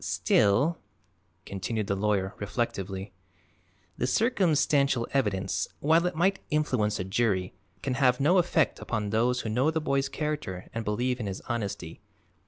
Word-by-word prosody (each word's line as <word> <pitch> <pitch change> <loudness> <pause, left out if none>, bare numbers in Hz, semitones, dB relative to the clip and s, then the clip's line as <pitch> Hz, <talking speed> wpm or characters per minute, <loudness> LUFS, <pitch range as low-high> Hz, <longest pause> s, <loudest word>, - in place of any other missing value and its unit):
"Still," 130 +12 +2 0.7
continued 100 +3 -3
the 100 - -1
lawyer 100 -1 0
reflectively, 100 -2 -3 0.9
"the - - +1
circumstantial 145 - +2
evidence, 100 -8 0
while 165 +4 +3
it 180 - -3
might 190 +4 +2
influence 125 -9 0
a - - -1
jury, 95 -2 0 0.3
can 135 - -1
have 125 -1 +3
no 170 +7 +4
effect 165 -3 +1
upon 105 -3 -3
those 120 +3 +2
who 110 - -4
know 125 +7 +2
the 160 0 0
boy's 140 -2 0
character 150 - -4
and 115 0 -3
believe 120 +4 -1
in 110 - -3
his 95 -1 -5
honesty. 105 -7 -4
120 Hz, 145 wpm, -28 LUFS, 100-150 Hz, 0.9 s, no